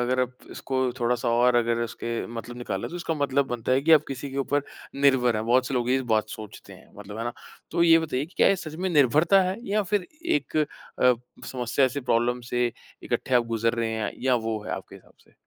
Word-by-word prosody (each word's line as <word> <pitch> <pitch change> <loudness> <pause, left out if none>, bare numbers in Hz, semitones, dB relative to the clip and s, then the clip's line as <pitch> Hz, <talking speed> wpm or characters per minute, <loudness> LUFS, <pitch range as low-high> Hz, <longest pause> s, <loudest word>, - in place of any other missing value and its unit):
अगर 125 +1 +1
आप 125 0 -2
इसको 130 -1 -3 0.2
थोड़ा-सा 120 0 +1
और 120 +1 +3
अगर 115 0 +1
उसके 115 0 -4
मतलब 115 +1 -7
निकाला 100 -5 -3
तो 175 - -7
इसका 170 -2 -2
मतलब 140 -1 +1
बनता 120 0 -2
है 130 - +4
कि 160 +2 +4
आप 155 -1 +6
किसी 135 +1 -5
के 135 - -7
ऊपर 145 +1 0 0.3
निर्भर 130 -4 +3
हैं। 110 - -2
बहुत 125 +2 +3
से 135 - -3
लोग 125 -1 0
ये 130 +1 +3
बात 110 0 +1
सोचते 105 -2 -10
हैं। - - -16
मतलब, 105 +1 -8
है 115 - -3
ना? 120 - -2 0.4
तो 170 - +2
ये 165 -1 +7
बताइए 150 -4 -2
कि 175 - -22
क्या - - +5
ये 195 - +3
सच 155 -3 -7
में 185 +4 -2
निर्भरता 155 +6 +4
है 185 +2 -1
या 210 +2 +2
फिर 195 -1 -1 0.2
एक 325 - -1
अ, 130 -4 +1 0.3
समस्या 125 +1 +1
से, 140 +2 -4
प्रॉब्लम 120 -1 +1
से 120 0 -1 0.3
इकट्ठे 130 - -1
आप 120 - +4
गुज़र 115 0 0
रहे 115 -1 -1
हैं 110 -1 -2
या 130 -1 +3
वो 110 -2 -1
है, - - -6
आपके - - -7
हिसाब - - -16
से? - - -27
125 Hz, 235 wpm, -26 LUFS, 120-145 Hz, 0.4 s, ये